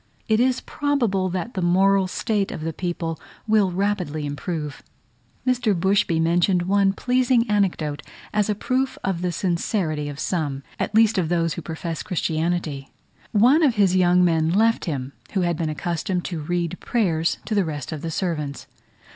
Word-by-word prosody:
It 220 0 +3
is 255 +1 +2
probable 235 -11 0
that 185 +6 -4
the 190 - -2
moral 190 +2 +3
state 205 +1 -1
of - - -6
the 160 +1 -3
people 170 -1 -3 0.3
will 215 -3 +3
rapidly 180 -6 -1
improve. 150 +1 -4 0.6
Mr. 245 -7 +1
Bushby 190 -2 +2
mentioned 175 +2 +2
one 195 +1 +3
pleasing 250 +2 +2
anecdote 180 -8 0 0.3
as 210 0 +1
a 210 - +1
proof 260 +5 -1
of 190 -3 -1
the 180 -1 0
sincerity 170 -4 -1
of 145 - -7
some, 145 -7 -2 0.2
at 210 - -2
least, 220 -2 +5
of 165 -3 -1
those 165 -2 +1
who - - -5
profess 160 0 -5
Christianity. 160 -4 -2 0.4
One 245 +9 +5
of 275 -7 +3
his 195 -3 +3
young 180 0 +4
men 160 -2 +2
left 225 +6 +2
him, 140 -5 -4 0.2
who 195 - +1
had 175 -1 +1
been 160 0 -2
accustomed 175 +3 -2
to 170 -4 -3
read 175 +2 -2
prayers 170 -9 0
to 225 - -3
the 200 -2 +3
rest 150 -3 -5
of 155 -3 -5
the 165 - -3
servants. 150 -5 -3
180 Hz, 170 wpm, -23 LUFS, 160-205 Hz, 0.6 s, least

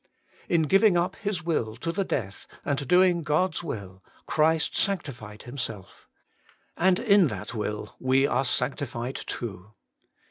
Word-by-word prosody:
In 170 -2 +3
giving 195 +4 +4
up 180 +3 0
His 200 -4 -3
will 120 -10 -1
to 145 +8 -3
the 195 +4 0
death, 100 - -4 0.2
and 140 -1 -1
doing 180 +1 +4
God's 170 +4 0
will, 95 - -6 0.2
Christ 160 0 +2
sanctified 120 - -2
Himself; 120 -6 -6 0.7
and 185 0 +3
in 200 -6 +5
that 105 -1 -6
will 105 -2 -4
we 130 +1 +3
are 135 - +1
sanctified 125 -1 -1
too. 105 -3 -6
140 Hz, 135 wpm, -27 LUFS, 110-175 Hz, 0.7 s, in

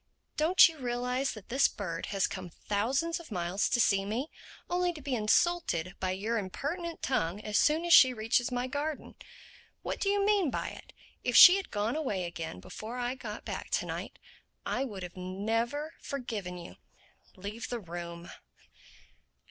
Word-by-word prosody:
Don't 335 +5 +7
you 320 -3 -8
realize 250 +2 -1
that 215 -3 -12
this 265 +3 +4
bird 170 -5 -5
has 195 -2 +1
come 185 -2 -5
thousands 260 - -1
of 335 - -12
miles 180 -1 -1
to 240 - +1
see 195 -4 +3
me—only 325 - -3
to 320 - -9
be 280 -2 -4
insulted 215 - +1
by 185 - -1
your 215 +5 -1
impertinent 320 - -4
tongue 180 -7 0
as 210 -1 0
soon 315 +3 +3
as 345 - +4
she 260 - +9
reaches 235 +1 0
my 245 0 -1
garden? 290 +3 -4 0.7
What - - -3
do 395 - +1
you 400 0 +2
mean 405 -6 +3
by - - -3
it?—If - - -7
she 360 +1 +11
had 390 - -5
gone 210 +4 -1
away 255 -12 -1
again 170 - -5
before 220 - -8
I 245 0 -1
got 260 - -8
back - - -5
to - - 0
night - - -6 0.5
I 260 - -1
would 195 -7 -6
never 225 - -2
have - - -28
forgiven 215 -10 -4
you—Leave 200 +4 -11
the 240 - -3
room." 170 -2 -7
235 Hz, 165 wpm, -30 LUFS, 190-295 Hz, 0.7 s, she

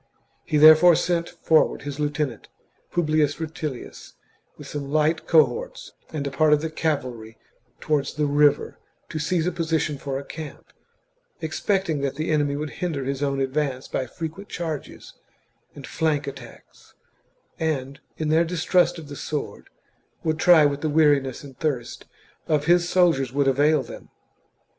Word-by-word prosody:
He 155 - 0
therefore 155 +3 +8
sent 170 0 0
for 160 -1 +3
ward - - -9
his 145 0 -6
lieutenant, 145 -5 -2 0.4
Publius 155 -3 +1
Rutilius, 155 -5 -6 0.4
with - - -11
some 140 -2 -6
light 155 +2 +1
cohorts 460 - +1 0.2
and 150 -3 -4
a 140 - -3
part 150 +2 +3
of 150 - +3
the 160 0 -4
cavalry 125 -9 -3 0.4
towards 150 -2 -1
the 150 -1 0
river, 145 0 +2 0.3
to 155 - -4
seize 165 +2 0
a 180 - 0
position 160 -4 -1
for 135 -1 -4
a 140 - -6
camp, 155 -1 -9 0.7
expecting 165 -1 -1
that 140 -1 -2
the 155 +2 -2
enemy 145 -2 +1
would 150 0 -4
hinder 160 -6 -2
his 135 0 -3
own 140 -1 0
advance 135 -1 -2
by 130 - -3
frequent 165 +9 -7
charges 160 -4 -6 0.6
and 140 - -9
flank 155 -3 -1
attacks, 140 - -12 0.6
and, 140 -4 -2 0.2
in 155 -1 -2
their 160 +2 +4
distrust 175 +1 +1
of 160 -3 -9
the 145 - -8
sword, 150 +1 -5 0.5
would 160 -1 -1
try 165 -2 +6
what 145 0 0
the 155 - -1
weariness 145 -4 +2
and 135 -2 -13
thirst 135 -7 -3 0.4
of 150 -2 +1
his 175 +1 +3
soldiers 165 -9 +2
would 140 0 +1
avail 145 +2 +3
them. - - -11
150 Hz, 155 wpm, -24 LUFS, 140-160 Hz, 0.7 s, therefore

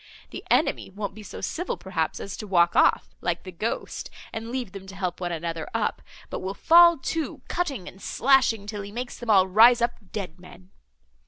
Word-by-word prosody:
The - - -7
enemy - - +2
won't 200 +1 -5
be 215 - -11
so 210 - -9
civil, 355 +2 -3
perhaps, 165 -4 -2
as 195 - -6
to 210 - -7
walk 175 -3 +3
off, - - +3
like 170 -1 -1
the 185 - -8
ghost, 210 +7 -4 0.2
and 225 +1 -5
leave 245 -5 -4
them 195 0 -10
to 195 - -10
help 185 -2 -3
one 175 -1 -2
another 165 -1 -4
up, - - -1 0.3
but - - -3
will 190 +1 -4
fall 340 +4 +7
to, 320 +3 -3
cutting 280 - -2
and 190 - -11
slashing, 250 -5 +3
till 205 -1 -5
he 200 +1 -8
makes 245 +3 -6
them 240 - -7
all 195 -3 +6
rise 230 +6 +7
up 235 -5 -2
dead 185 -5 -5
men. 180 +1 -15
200 Hz, 200 wpm, -25 LUFS, 185-240 Hz, 0.3 s, fall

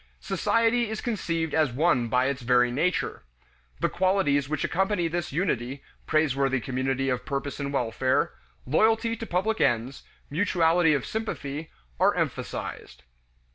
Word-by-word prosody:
Society 230 0 +1
is 220 - -3
conceived 165 - -2
as 155 -5 +2
one 130 -2 +2
by 125 +2 +2
its 140 0 -1
very 125 0 +3
nature. 165 +8 -1 0.6
The - - +2
qualities 180 -7 +1
which 155 -1 -1
accompany 190 -1 +1
this 175 +1 -3
unity, 140 -5 -2 0.2
praiseworthy 135 -4 +2
community 130 +2 -1
of 125 -1 -1
purpose 140 0 -4
and 140 -1 -3
welfare, 130 0 0 0.3
loyalty 225 - +2
to 230 - -6
public 215 +5 0
ends, 120 +3 +1 0.3
mutuality 165 -1 +3
of 140 - -2
sympathy, 155 -9 -4 0.3
are - - +4
emphasized. 65 - -4
150 Hz, 135 wpm, -26 LUFS, 130-185 Hz, 0.6 s, are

